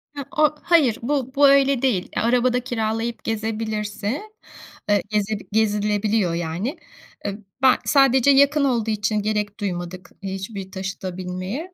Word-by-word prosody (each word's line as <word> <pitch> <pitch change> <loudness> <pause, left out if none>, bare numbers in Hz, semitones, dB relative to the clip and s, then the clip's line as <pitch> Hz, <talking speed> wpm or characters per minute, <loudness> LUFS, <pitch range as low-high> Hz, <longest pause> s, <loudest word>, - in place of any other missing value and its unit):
Hıı, 280 - -5
o 305 0 +4
hayır, 300 -10 +4
bu 260 0 -2
bu 285 0 +6
öyle 275 -2 +4
değil. 230 -9 0
Araba 245 +2 +2
da 250 - +2
kiralayıp 230 -1 -3
gezebilirse, 220 - -3 0.7
eee, 205 -1 +4
gezeb 210 0 -1
gezilebiliyor, 210 -2 +1
yani. 175 - -3 0.5
I - - +1 0.3
ben 260 -1 +6
sadece 270 -1 +5
yakın 280 +2 +4
olduğu 235 -5 +1
için 210 0 0
gerek 210 0 -2
duymadık 180 -2 -5
hiçbir 195 0 -6
taşıta 190 -1 -5
binmeye. 185 - -5
220 Hz, 135 wpm, -22 LUFS, 200-260 Hz, 0.7 s, bu